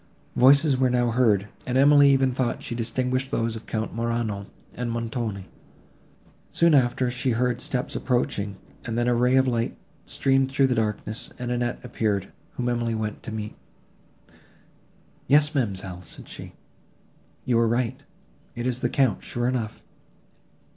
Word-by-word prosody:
Voices 140 +2 +5
were 130 0 +3
now 120 -1 +2
heard, 110 -5 +3 0.2
and 125 +1 +1
Emily 145 +1 +7
even 135 -1 +3
thought 125 -2 -1
she - - -5
distinguished 125 +3 -1
those 115 -2 -1
of 115 - -9
Count 110 0 -3
Morano 115 -3 -2 0.3
and 120 0 -3
Montoni. 115 -4 -3 1.0
Soon 170 -1 +3
after 125 -2 +3
she 125 0 -1
heard 125 +1 0
steps 125 0 -3
approaching, 105 -6 -1 0.3
and 115 -1 -3
then 120 0 +1
a 125 - +3
ray 125 +2 +3
of 130 0 +4
light 120 -2 -1 0.3
streamed 135 -1 +2
through 135 0 +3
the 130 - +2
darkness, 110 +1 -2
and 125 0 -4
Annette 120 0 -1
appeared, 105 -5 -1 0.2
whom 125 - -3
Emily 120 -1 0
went 110 -1 -4
to - - -7
meet. 105 -1 -5 1.7
"Yes, 150 +2 +4
ma'amselle," 95 -8 -2
said - - -9
she, - - -9 0.9
"you 120 -2 +2
were 115 0 +3
right, 120 +2 -1 0.5
it 120 - -4
is 125 -1 0
the 120 - 0
Count 130 -6 +1
sure 120 0 -2
enough." 120 -4 -3
120 Hz, 155 wpm, -25 LUFS, 115-130 Hz, 1.7 s, Emily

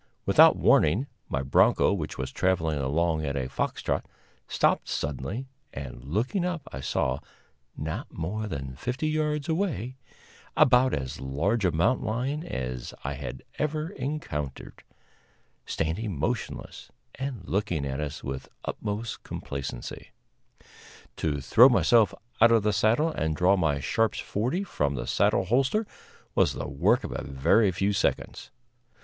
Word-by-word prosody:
Without - - +7
warning, 95 - +4 0.2
my 65 +1 -1
bronco, 65 - +4
which - - -4
was 65 0 -3
traveling 80 -5 +1
along 80 +4 +1
at 70 -2 -2
a 65 -2 -1
fox - - -3
trot, - - 0 0.4
stopped - - +2
suddenly, 75 - -3 0.3
and 70 -1 -7
looking 110 - -1
up 175 -4 -2
I 65 - -5
saw, 65 0 0 0.6
not 80 +1 -4
more 105 +7 -3
than 70 -8 -5
fifty 125 - -2
yards 150 -1 0
away, 155 - -1 0.6
about 130 -3 +5
as 65 -2 -5
large 85 - 0
a 90 - +3
mountain 95 +12 +1
lion 130 +8 -1
as 65 - -5
I 70 - -2
had 65 - -7 0.2
ever 155 +1 -1
encountered, 130 - -5 0.9
standing 85 +3 -2
motionless 110 - -3 0.2
and 130 -9 -5
looking 90 -7 -1
at 70 0 -3
us 75 -1 -4
with 65 0 -5 0.2
utmost 110 +2 -4
complacency. 70 -3 -6 1.1
To 75 -3 -1
throw 120 - +7
myself 115 -3 +4 0.3
out 115 +1 +8
of 115 -2 +4
the 105 0 +2
saddle 115 - +3
and 80 - -1
draw 90 +4 +4
my 80 -6 +1
Sharps 115 +11 +1
forty 125 - -1
from 75 - -1
the - - -3
saddle 95 - +2
holster 135 - +2 0.5
was - - +3
the - - -4
work 70 -1 +2
of - - -5
a - - -4
very 70 +10 +3
few 100 +3 0
seconds. 100 - -1
95 Hz, 145 wpm, -27 LUFS, -, 1.1 s, out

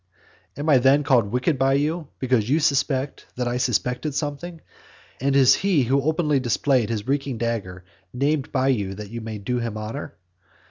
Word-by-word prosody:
Am 145 +2 -4
I 145 -4 +6
then 135 +3 +4
called 125 -7 +3
wicked 130 +3 0
by 135 0 +3
you 155 +3 -1
because 125 -4 0
you 150 +4 +3
suspect 140 -2 0
that 125 -1 -2
I 120 +1 -1
suspected 125 +4 -1
something; 160 +4 -4 0.6
and 135 +1 0
is 135 -2 +6
he 190 -8 +2
who 135 +3 +1
openly 150 -1 +1
displayed 125 -1 +1
his 110 -1 -3
reeking 140 -2 -1
dagger, 100 -6 -4 0.3
named 140 +2 -1
by 135 -1 +1
you 100 -7 -1
that 105 0 -9
you 115 0 -5
may 110 -1 -6
do 120 +5 -2
him 115 -2 -4
honour? 110 +1 -6
130 Hz, 180 wpm, -23 LUFS, 115-145 Hz, 0.6 s, I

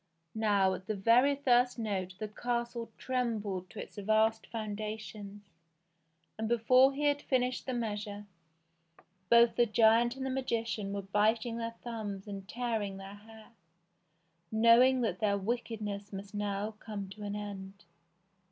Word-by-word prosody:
Now 205 -3 +2
at 185 0 -7
the 215 - -1
very 240 +8 +4
first 250 -3 +3
note 190 -5 -3
the 215 - -4
castle 235 +1 -3
trembled 215 -8 -2
to - - -10
its - - -9
vast 220 +2 +2
foundations, 215 -1 -6 1.0
and 220 0 -1
before 255 +3 +5
he 295 - -3
had 290 0 +2
finished 250 -1 0
the 255 - -1
measure, 210 -3 -4 1.0
both 235 0 +6
the 240 -1 +4
giant 230 +2 +4
and 265 0 -5
the 265 - -1
magician 230 -5 -2
were 200 0 -3
biting 220 +4 +1
their 230 0 -4
thumbs 210 -4 -5
and 195 -2 -7
tearing 225 -5 -2
their 195 0 -9
hair, 220 +2 -14 1.0
knowing 235 +4 +6
that 195 -6 -1
their 200 -2 +2
wickedness 210 -1 -3
must 200 +1 -8
now 205 0 -2
come 205 -3 -6
to 210 +2 -11
an 205 0 -4
end. 200 -2 -7
220 Hz, 145 wpm, -32 LUFS, 205-235 Hz, 1.0 s, both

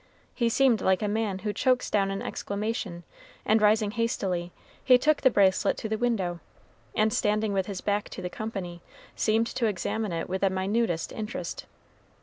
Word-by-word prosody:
He 235 -2 +1
seemed 250 -2 +3
like 190 +2 +2
a - - +1
man 210 -2 -1
who 210 - 0
chokes 255 +4 +1
down 195 -2 +2
an 195 0 -3
exclamation; 200 -4 -4 0.4
and 215 0 +3
rising 210 0 +3
hastily, 195 -6 -1 0.3
he 255 -1 +7
took 300 +4 +2
the 260 - +6
bracelet 195 -5 +3
to - - -4
the 220 - -1
window, 195 -8 0 0.6
and 215 0 +2
standing 210 0 +1
with 190 -1 0
his 195 -3 -5
back 205 0 -1
to - - -7
the - - -1
company, 180 -4 -6 0.3
seemed 225 +1 +2
to 230 0 -1
examine 210 +1 -2
it 165 -1 -3
with 190 +1 -3
the 195 - +4
minutest 190 -2 -1
interest. 215 +1 -5
210 Hz, 175 wpm, -27 LUFS, 190-225 Hz, 0.6 s, he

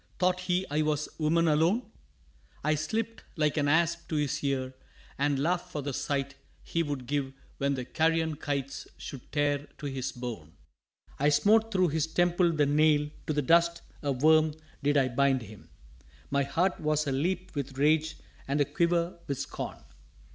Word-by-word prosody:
thought 180 0 +2
he 180 0 0
I 150 +1 +2
was 150 -1 0
woman 165 +2 +3
alone? 165 +10 +3 0.8
I 155 +1 +2
slipt 220 +9 -2
like 150 -3 +1
an 145 -2 +1
asp 170 +2 +2
to 160 - -2
his 150 -2 -1
ear 130 -2 -1 0.5
and 145 0 +2
laughed 175 +5 0
for 150 - -4
the 140 0 -3
sight 140 +1 -2 0.3
he 165 - -1
Would 145 -5 -3
give 135 0 -2 0.3
when 140 0 +1
the 125 -2 -4
carrion 160 +1 +1
kites 140 -2 -3
should 135 -4 -9
tear 145 -1 0
to 150 - -8
his 135 -2 -3
bone. 115 -11 -7 0.7
I 145 +2 +4
smote 215 +10 +4
thro' 185 -3 +3
his 160 0 0
temple 175 +1 +2
the 150 -3 +2
nail, 150 0 +3 0.2
to 155 - 0
the 150 0 0
dust, 170 +4 +3 0.2
a 145 - 0
worm, 155 +3 +4 0.3
did 145 0 +2
I 135 -2 +4
bind 130 0 +2
him. 105 -1 -13 0.6
My 140 0 +2
heart 170 +7 0
was 155 0 +1
a 140 - -1
leap 180 +7 -1
with 140 -2 -4
rage 155 +2 +2 0.3
and 140 +2 0
a 145 - +4
quiver 170 +3 0
with 140 - -2
scorn. - - -5
150 Hz, 175 wpm, -29 LUFS, 140-165 Hz, 0.8 s, I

